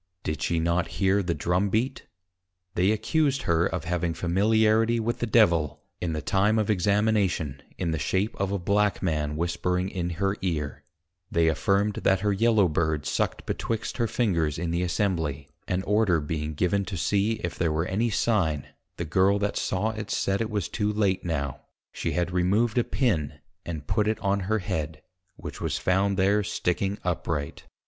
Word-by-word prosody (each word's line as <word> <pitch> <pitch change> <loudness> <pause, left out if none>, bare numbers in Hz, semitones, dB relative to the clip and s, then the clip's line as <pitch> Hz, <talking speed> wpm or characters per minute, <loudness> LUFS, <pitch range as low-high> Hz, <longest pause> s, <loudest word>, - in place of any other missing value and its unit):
Did 75 -1 -3
she 85 +3 +1
not 85 +2 +1
hear 100 0 +3
the 85 -3 -1
Drum 90 +3 +1
beat? 120 +7 -1 0.7
They 90 +3 +2
accused 135 +6 +1
her 85 +1 +2
of 90 - -3
having 85 -1 -1
Familiarity 110 +5 +3
with 115 +1 -2
the 120 - -1
Devil, 85 - +3 0.2
in 85 -2 -1
the 75 -2 -3
time 105 +6 +2
of 110 -1 +1
Examination, 100 -7 +1 0.2
in 85 -3 -1
the 80 - -1
shape 100 +4 0
of 100 0 0
a 100 - 0
Black 100 +3 +1
Man 75 -4 -1
whispering 90 +3 -1
in 90 -3 -3
her 95 +3 -1
Ear; 75 -6 -3 0.5
they 85 -1 +2
affirmed, 100 +7 +1
that 95 -1 +2
her 105 -1 +1
Yellow 110 -1 +4
Bird 80 -2 0
sucked - - -1
betwixt 115 +3 -3
her 115 -2 +1
Fingers 85 -10 0
in 85 0 -2
the 85 +1 0
Assembly; 85 -6 -1 0.2
and 90 0 -1
Order 105 -5 +3
being 75 0 -3
given 90 +5 +1
to 95 -3 -5
see 100 +5 +1
if 85 - -3
there 80 -2 0
were 80 +2 0
any 110 +6 0
sign, 95 - 0 0.3
the - - -3
Girl 95 +5 +3
that 100 0 -1
saw 105 +4 0
it, 110 -2 -6
said, 100 +2 0
it 110 - -1
was 105 -5 -2
too 105 0 -1
late 100 -3 +1
now; 70 -6 -3 0.3
she - - -3
had 90 0 0
removed 105 +7 +2
a - - +3
Pin, 85 - 0 0.3
and 80 -4 -5
put 105 +7 +1
it 110 - +1
on 100 -1 +1
her 105 +3 0
Head; 80 -5 -4 0.3
which - - -8
was - - -1
found 95 +1 +1
there 100 +2 +3
sticking 95 +1 -1
upright. 80 -4 -3
95 Hz, 180 wpm, -26 LUFS, 85-105 Hz, 0.7 s, Yellow